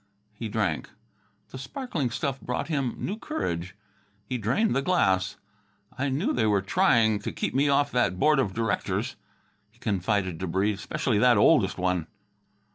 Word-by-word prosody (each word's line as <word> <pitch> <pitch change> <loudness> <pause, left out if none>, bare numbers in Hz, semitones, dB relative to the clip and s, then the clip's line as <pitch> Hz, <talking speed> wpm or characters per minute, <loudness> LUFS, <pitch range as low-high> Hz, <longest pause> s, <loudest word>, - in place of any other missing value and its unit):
He 110 +1 -6
drank. 100 -8 -1 0.6
The 130 - -8
sparkling 165 - -3
stuff 135 +3 -3
brought 125 +6 -3
him 135 -6 -1
new 210 +4 -4
courage. 95 - -3 0.5
He 125 -1 -3
drained 130 - +1
the 135 - +2
glass. 95 - +1 0.6
"I 140 +2 -1
knew 170 - 0
they 110 - +1
were 100 -2 +2
trying 115 - +3
to - - -4
keep - - -3
me 140 +2 +2
off 140 0 +2
that 120 -8 +1
board 150 +5 +4
of 105 -8 +1
directors," 115 -2 -1 0.5
he 110 - -29
confided 100 -5 -1
to 95 - -3
Breede, 95 +4 0
"specially 125 -2 -1
that 120 0 +5
oldest - - +4
one." 90 -3 0
115 Hz, 160 wpm, -27 LUFS, 100-140 Hz, 0.6 s, that